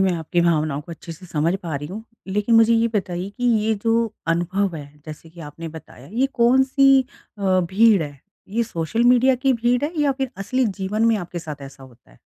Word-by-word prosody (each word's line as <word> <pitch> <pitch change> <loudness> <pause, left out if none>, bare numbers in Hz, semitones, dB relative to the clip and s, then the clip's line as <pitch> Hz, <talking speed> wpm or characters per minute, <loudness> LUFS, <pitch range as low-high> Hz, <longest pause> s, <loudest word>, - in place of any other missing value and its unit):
मैं 190 -1 +3
आपकी 170 +1 -1
भावनाओं 155 -4 +1
को 170 +3 -10
अच्छे 165 +1 -9
से 180 +3 -13
समझ 165 +2 0
पा 165 -4 -4
रही 145 +1 -4
हूँ। 215 +4 -7 0.2
लेकिन 210 +4 0
मुझे 225 0 +6
ये 230 +1 +2
बताइए 180 -1 -2
कि 245 +4 -6 0.2
ये 220 0 +2
जो 225 -1 +1
अनुभव 175 +3 0
है, 145 -2 -8 0.2
जैसे 155 +1 -10
कि 170 0 -14
आपने 160 +2 -8
बताया 150 -4 -12
ये 255 +4 +2
कौन-सी 265 +3 +4 0.4
अ, 190 -2 +2
भीड़ 195 +2 +3
है? 145 -2 -8 0.3
ये 230 +4 0
सोशल 225 +3 -2
मीडिया 250 +2 +5
की 265 +1 +1
भीड़ 245 +3 +1
है 315 - -3
या 285 -2 +3
फिर 265 -1 -3
असली 255 +6 -1
जीवन 210 +4 -1
में 225 -1 +3
आपके 175 -2 -6
साथ 150 -3 -8
ऐसा 135 0 -11
होता 120 - -18
है? - - -22
190 Hz, 215 wpm, -22 LUFS, 165-235 Hz, 0.4 s, मुझे